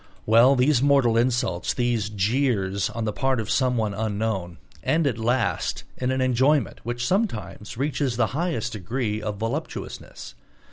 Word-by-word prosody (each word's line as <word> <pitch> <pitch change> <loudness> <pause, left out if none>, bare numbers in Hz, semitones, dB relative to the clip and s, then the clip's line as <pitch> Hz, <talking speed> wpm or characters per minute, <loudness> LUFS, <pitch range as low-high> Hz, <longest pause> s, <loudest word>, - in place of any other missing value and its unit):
Well, 115 +5 +6
these 130 0 +3
mortal 135 -5 +4
insults, 125 +1 0
these 120 -4 0
jeers 100 -2 0
on 115 -1 -4
the 105 - -1
part 130 +1 0
of 110 - -3
someone 120 -5 +1
unknown, 100 -4 -2 0.3
end 160 0 +2
at 120 -5 0
last 115 -1 0
in 125 - -2
an 130 0 0
enjoyment 130 +1 +2
which 120 +1 -3
sometimes 125 - -2
reaches 135 -2 -1
the 125 - +3
highest 160 -6 -1
degree 110 +2 -2
of 105 -1 -4
voluptuousness. 115 +2 -5
120 Hz, 145 wpm, -24 LUFS, 110-130 Hz, 0.3 s, Well